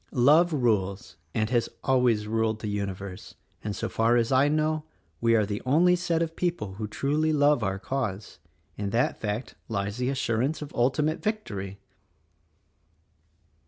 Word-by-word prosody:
Love 150 +8 +5
rules, 100 - 0 0.2
and 110 +1 0
'has 120 -2 +1
always 125 -5 +2
ruled 110 0 0
the 110 - -5
universe; 100 -1 -5 0.3
and 105 -1 -3
so - - -2
far 115 +2 +2
as 115 +1 +1
I 135 +2 +5
know, 155 +1 +1 0.4
we 115 0 +3
are 110 -2 +3
the 105 0 -4
only 170 +7 +4
set 170 -2 0
of 165 0 -5
people 170 - -2
who 105 +2 -5
truly 150 +7 0
love 145 -3 +3
our 95 -2 -1
cause. 110 -3 -4 0.4
In 100 -1 -2
that 120 +8 0
fact 105 +3 -3 0.2
lies 100 0 -2
the 125 +1 0
assurance 130 +2 0
of 145 - -10
ultimate 150 +6 +1
victory." 100 - -3
120 Hz, 155 wpm, -27 LUFS, 105-150 Hz, 0.4 s, Love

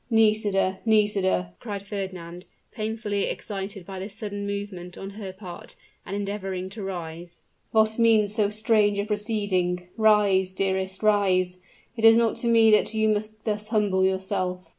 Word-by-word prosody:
"Nisida, 210 -4 +2
Nisida!" 200 - +2
cried 200 -1 -6
Fernand, 185 -3 -6 0.3
painfully 215 -2 -2
excited 195 -2 -5
by 190 0 -7
this 195 +2 -7
sudden 205 -2 -5
movement 200 -3 -5
on 195 +1 -7
her 200 -2 -7
part, 185 -2 -11 0.3
and 195 - -4
endeavoring 195 -2 -4
to 210 +3 -8
rise: 175 -2 -7 0.3
"what 220 +1 +2
means 220 -3 +4
so 210 -2 +2
strange 210 -1 +2
a 200 - 0
proceeding? 205 -5 -1
Rise, 205 -4 +3
dearest, 190 0 -2
rise; 185 -4 +2 0.4
it 225 - -6
is 225 0 +9
not 230 -1 +2
to 235 - -3
me 225 -1 +6
that 215 +1 +3
you 220 0 +2
must 215 +1 -2
thus 210 -1 -2
humble 205 -4 +1
yourself!" 185 -1 -1
200 Hz, 150 wpm, -25 LUFS, 190-215 Hz, 0.4 s, is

